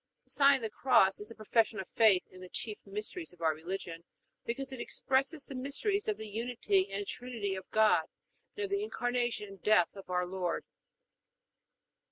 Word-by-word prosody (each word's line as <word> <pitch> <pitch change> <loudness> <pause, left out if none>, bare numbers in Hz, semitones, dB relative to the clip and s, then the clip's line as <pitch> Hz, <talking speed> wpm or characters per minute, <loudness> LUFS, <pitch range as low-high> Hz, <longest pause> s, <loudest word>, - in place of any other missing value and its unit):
The - - -17
sign 280 -1 +6
of 265 - -3
the 220 - -2
Cross 210 -8 +4
is 210 +1 -6
a 230 - -9
profession 220 0 +1
of 190 - -5
faith 215 -5 +5
in 185 - -13
the 185 - -9
chief 215 +2 -3
mysteries 210 - -4
of 175 - -19
our 160 -1 +3
religion 170 +1 -6 0.4
because 270 +3 -3
it 260 - -7
expresses 275 +3 0
the - - -7
mysteries 285 +11 -1
of 210 - 0
the 220 0 -6
Unity 210 -3 0
and 200 +1 -2
Trinity 230 -4 -4
of 190 -1 -7
God 215 0 +4 0.5
and 415 - -2
of 395 - -3
the 400 0 +1
Incarnation 245 - -1
and 195 -2 -12
death 205 -5 +4
of 195 -2 -11
our 180 0 +1
Lord. 180 -2 -2
215 Hz, 190 wpm, -32 LUFS, 190-255 Hz, 0.5 s, sign